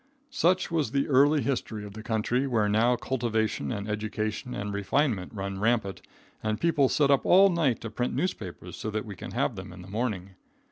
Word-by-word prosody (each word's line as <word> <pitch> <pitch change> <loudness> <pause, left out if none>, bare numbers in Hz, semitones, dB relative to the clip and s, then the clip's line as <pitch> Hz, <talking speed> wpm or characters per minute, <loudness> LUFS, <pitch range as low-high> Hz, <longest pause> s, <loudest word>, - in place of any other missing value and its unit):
Such 185 - +2
was 155 -7 +1
the 140 0 +1
early 145 +2 +4
history 110 -6 -2
of 100 - -9
the 110 - -8
country 120 +4 0
where 110 -5 +2
now 115 +4 +3
cultivation 120 -4 -1
and 105 -3 -4
education 110 +3 -3
and 100 0 -4
refinement 100 -1 0
run 100 -2 -4
rampant 105 -3 0 0.4
and 110 0 -1
people 150 -6 +3
sit 145 -2 +3
up 140 - +4
all 195 +2 +6
night 155 -9 +1
to 115 - -6
print 125 +3 -2
newspapers 90 - -4
so 110 - -4
that 110 0 -3
we 100 -3 -7
can - - -8
have - - 0
them - - -8
in 90 0 -10
the - - -12
morning. 100 -3 -3
115 Hz, 195 wpm, -28 LUFS, 105-140 Hz, 0.4 s, all